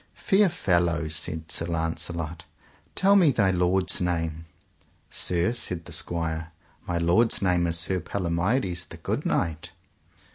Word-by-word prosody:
Fair 200 -1 +3
fellow, 85 - +1
said 80 +1 -1
Sir 85 - 0
Launcelot, 85 0 -3 0.5
tell 200 +1 +4
me 180 -6 +6
thy 100 -8 +2
lord's 90 +1 +1
name. 80 -2 -2 0.7
Sir, 90 +5 +1
said 90 -8 -2
the - - -8
squire, 80 -1 -2 0.4
my 90 - -1
lord's 90 +8 +2
name 90 -3 +2
is 85 0 +2
Sir 90 +3 +1
Palomides, 90 +1 -1
the - - -11
good - - -3
knight. 80 -1 -1
85 Hz, 135 wpm, -26 LUFS, 85-95 Hz, 0.7 s, me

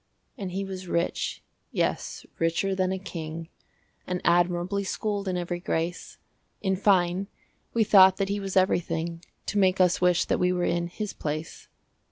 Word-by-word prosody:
And 190 -3 -5
he 195 +2 -2
was 190 -1 -7
rich, 170 0 -1 0.3
yes, - - -2
richer 165 +4 +1
than 185 -1 +1
a 190 - -1
king, 165 -3 -6 0.6
And 180 0 -1
admirably 175 +3 +2
schooled 205 0 -2
in 185 -1 0
every 175 0 -3
grace: 170 0 -3 0.4
In 190 -1 0
fine, 185 -1 +2 0.5
we 230 - +5
thought 190 -3 +7
that 195 - 0
he 200 +1 -1
was 195 -1 -2
everything 170 -2 +1 0.2
To 205 - 0
make 190 -1 +3
us 180 -1 +3
wish 180 -1 +3
that - - 0
we 180 0 +3
were 180 -1 0
in 170 0 0
his 210 +4 -5
place. 155 +1 -5
180 Hz, 165 wpm, -27 LUFS, 170-195 Hz, 0.6 s, thought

